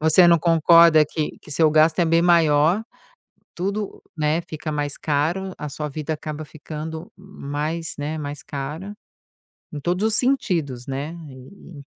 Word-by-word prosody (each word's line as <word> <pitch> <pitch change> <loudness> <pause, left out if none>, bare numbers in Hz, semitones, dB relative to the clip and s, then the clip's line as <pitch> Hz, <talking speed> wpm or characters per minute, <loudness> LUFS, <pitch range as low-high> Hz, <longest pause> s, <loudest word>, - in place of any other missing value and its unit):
você 160 +3 +6
não 170 -1 +6
concorda 165 -1 +6
que 155 0 -4
que - - -15
seu 155 +2 +3
gasto 155 +2 +4
é - - +4
bem 165 0 +3
maior, 170 +1 +4 0.7
tudo, 200 +3 -3
né, 155 +1 0
fica 155 -1 -6
mais 145 -1 -3
caro, 165 +6 -1
a 150 - -5
sua 150 +1 -5
vida 155 +2 -4
acaba 155 0 -6
ficando 160 +5 -8
mais 165 -3 -5
né, 150 +2 -3
mais 145 -1 -6
cara 150 +8 -6 0.8
em 150 - -5
todos 180 +7 -1
os 220 - 0
sentidos, 165 - 0
né. 140 +4 -4 0.2
E 140 +3 -13
155 Hz, 150 wpm, -22 LUFS, 150-170 Hz, 0.8 s, você